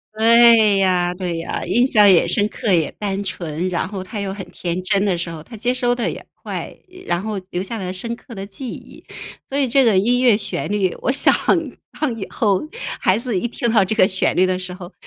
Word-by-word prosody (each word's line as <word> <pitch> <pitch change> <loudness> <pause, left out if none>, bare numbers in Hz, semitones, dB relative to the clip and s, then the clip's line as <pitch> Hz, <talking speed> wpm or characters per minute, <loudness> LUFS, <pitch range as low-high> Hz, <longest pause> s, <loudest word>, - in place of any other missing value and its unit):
对 225 -2 +6
呀， 180 -2 +2
对 180 -2 -3
呀， 165 - -4
印 240 +9 +2
象 210 -5 +5
也 170 - +4
深 205 +4 +2
刻、 215 -1 -3
也 165 -4 +2
单 200 -1 -2
纯。 175 -3 -4
然 180 +1 -2
后 195 -2 -6
他 205 +3 -7
又 195 -1 -3
很 195 -1 -7
天 175 +1 -4
真 195 +1 +1
的 195 -4 0
时 170 0 -4
候， 160 - -8
他 225 +8 -12
接 245 +3 0
收 245 -1 +1
得 240 - -1
也 - - -9
快， - - -6 0.2
呃， 370 - -13
然 175 0 0
后 210 0 -4
留 180 - -3
下 225 +3 -5
了 185 -2 -4
深 230 +6 -3
刻 235 -1 -13
的 195 0 -6
记 235 +5 -7
忆。 - - -11 0.4
所 275 - -4
以 275 - +2
这 265 +2 +3
个 215 -5 +3
音 245 +6 +2
乐 235 -5 +5
旋 205 -1 -3
律， 195 -3 0
我 260 - +1
想 275 - +4 0.7
让 285 -7 -1
以 205 -4 -6
后 200 -4 +1 0.4
孩 185 - +3
子 230 -4 -1
一 240 - -2
听 235 -1 -2
到 215 -4 +4
这 215 +4 -2
个 190 - +5
旋 185 -2 +1
律 185 - +4
的 185 0 -1
时 180 0 -6
候， 180 -1 -10
200 Hz, 255 characters per minute, -20 LUFS, 185-230 Hz, 0.7 s, 对